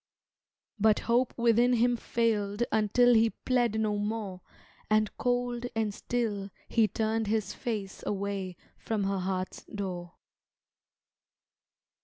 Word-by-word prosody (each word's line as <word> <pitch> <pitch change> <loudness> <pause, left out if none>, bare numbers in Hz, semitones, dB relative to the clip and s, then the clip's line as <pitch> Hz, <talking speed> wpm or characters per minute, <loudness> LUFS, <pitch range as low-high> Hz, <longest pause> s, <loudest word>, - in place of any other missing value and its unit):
But 215 0 +4
hope 240 +2 +2
within 235 +1 +4
him 240 +1 +3
failed 225 -2 0
Until 220 +3 +4
he 225 0 +5 0.2
pled 240 -4 +2
no 210 -1 +1
more 205 -3 -3 0.5
And 215 -1 +2
cold 245 -1 0
and 220 -2 0
still 210 -4 -2 0.2
he 225 -2 +3
turned 220 0 -1
his 210 -2 0
face 210 -5 -4
Away 195 -2 -2 0.2
from 215 -3 -2
her 195 0 0
heart's 185 0 -3
door. 180 -4 -5
220 Hz, 115 wpm, -29 LUFS, 200-235 Hz, 0.5 s, he